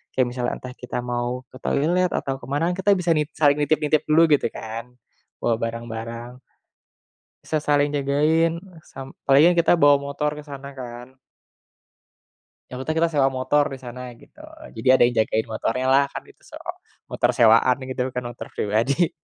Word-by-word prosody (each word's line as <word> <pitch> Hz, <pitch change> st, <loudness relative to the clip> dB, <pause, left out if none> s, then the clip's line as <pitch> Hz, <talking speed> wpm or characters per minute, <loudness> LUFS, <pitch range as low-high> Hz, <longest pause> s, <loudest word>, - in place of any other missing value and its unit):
kayak 130 Hz, -2 st, +2 dB
misalnya 125 Hz, 0 st, -2 dB
entah 125 Hz, 0 st, -9 dB
kita 125 Hz, 0 st, -5 dB
mau 120 Hz, +1 st, -3 dB
ke 130 Hz, -, -12 dB
toilet 175 Hz, +5 st, +1 dB
atau 135 Hz, -1 st, -2 dB
ke -, -, -10 dB
mana 165 Hz, +5 st, 0 dB
kan -, -, -3 dB
kita 205 Hz, -, +3 dB
bisa 175 Hz, -2 st, 0 dB
nit 150 Hz, 0 st, 0 dB
saling 145 Hz, -2 st, +4 dB
nitip-nitip 150 Hz, 0 st, +1 dB
dulu 160 Hz, +1 st, +5 dB
gitu -, -, -2 dB
kan, 115 Hz, +3 st, -7 dB, 0.5 s
bawa 115 Hz, -, +1 dB
barang-barang. 115 Hz, +2 st, -6 dB, 1.0 s
Bisa 155 Hz, -, -1 dB
saling 145 Hz, 0 st, +3 dB
jagain, 150 Hz, +4 st, +2 dB, 0.4 s
sam 135 Hz, -, -8 dB, 0.2 s
apalagi 140 Hz, +2 st, +5 dB
kan 175 Hz, -1 st, +2 dB
kita 170 Hz, -, +3 dB
bawa 145 Hz, 0 st, +7 dB
motor 145 Hz, +1 st, -1 dB
ke 150 Hz, -, -8 dB
sana 140 Hz, 0 st, -8 dB
kan. 120 Hz, +1 st, -9 dB, 1.5 s
Yang 125 Hz, -, -7 dB
Kuta 155 Hz, -, -1 dB
kita 165 Hz, 0 st, +3 dB
sewa 135 Hz, -2 st, +3 dB
motor 145 Hz, +3 st, +2 dB
di -, -, -6 dB
sana, 125 Hz, 0 st, -8 dB, 0.2 s
gitu. -, -, -20 dB, 0.4 s
Jadi 130 Hz, -, -4 dB
ada 130 Hz, -, +4 dB
yang 120 Hz, 0 st, -1 dB
jagain 110 Hz, 0 st, 0 dB
motornyalah, 130 Hz, +5 st, +2 dB
kan -, -, -5 dB
itu -, -, -21 dB
sewa -, -, -11 dB, 0.4 s
motor -, -, +1 dB
sewaan 115 Hz, +2 st, +5 dB
gitu 130 Hz, -1 st, -3 dB
bukan 125 Hz, 0 st, -3 dB
motor 120 Hz, -, -9 dB
pribadi. 125 Hz, -, +1 dB
135 Hz, 170 wpm, -23 LUFS, 120-150 Hz, 1.5 s, bawa